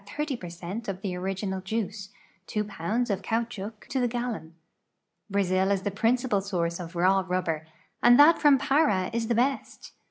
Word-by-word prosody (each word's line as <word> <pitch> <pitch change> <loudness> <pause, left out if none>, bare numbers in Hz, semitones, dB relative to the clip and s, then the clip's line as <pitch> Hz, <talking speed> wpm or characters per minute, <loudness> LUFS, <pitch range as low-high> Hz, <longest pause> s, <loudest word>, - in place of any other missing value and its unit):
0 300 -2 -1
per 180 -6 -8
cent 175 +6 -6
of 195 -2 -3
tlu; 185 -3 -2
original 190 +1 -3
juici", 200 0 -4 0.4
two 210 - -1
pounds 210 +4 -2
of 195 -1 -1
caoutchouc 225 0 -3
to 265 - -1
the 245 - +2
gallon. 235 -9 -4 0.7
Brazil 190 -1 +1
is 195 -1 +1
the 205 - -1
[)rinci|)a.l 225 +1 +1
source 170 -3 -2
of 175 0 -8
raw 190 +2 +3
rublxM'. 180 -4 -2 0.4
and 240 0 +7
that 310 +3 +7
from 290 -2 +6
Para 275 -9 +2
is 230 -1 -1
the 235 - +1
best. 265 +4 -1
200 Hz, 170 wpm, -27 LUFS, 185-240 Hz, 0.7 s, and